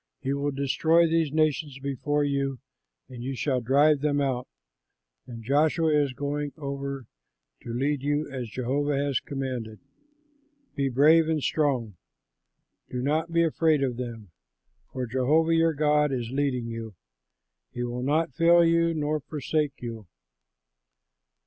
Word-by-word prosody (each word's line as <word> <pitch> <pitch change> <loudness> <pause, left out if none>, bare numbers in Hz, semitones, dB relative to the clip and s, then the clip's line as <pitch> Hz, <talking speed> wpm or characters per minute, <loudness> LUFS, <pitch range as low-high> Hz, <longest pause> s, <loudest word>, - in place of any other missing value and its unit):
He 135 - -2
will 140 +1 -1
destroy 150 +5 +2
these 165 -2 +1
nations 155 -2 0
before 140 +2 -1
you, 140 -1 -1 0.5
and 125 -2 -10
you 130 +2 -4
shall 130 -1 0
drive 140 +5 +4
them 145 -1 +1
out; 130 -3 -1 0.8
and 115 -2 -9
Joshua 155 +5 +2
is 145 -3 +2
going 145 +1 -3
over 140 -2 -5 0.6
to - - -10
lead 135 +3 -1
you 145 +2 0
as 130 -4 -6
Jehovah 140 +5 -1
has 140 -2 0
commanded. 130 -6 -5 1.0
Be 140 -1 0
brave 155 +5 +5
and 155 -3 0
strong, 125 - 0 0.9
do 125 - -4
not 155 +6 0
be 170 0 +3
afraid 160 -2 +2
of 125 -3 -1
them, 115 -6 -7 0.6
for 130 -1 -3
Jehovah 145 +7 +2
your 165 0 +3
God 150 0 +2
is 120 -3 -3
leading 135 -3 -1
you; 115 -2 -6 0.8
he 120 0 -4
will 120 0 -3
not 145 +2 0
fail 170 +4 +5
you 170 0 +2
nor 155 0 -1
forsake 150 -1 -3
you." 115 -4 -6
140 Hz, 140 wpm, -26 LUFS, 125-150 Hz, 1.0 s, brave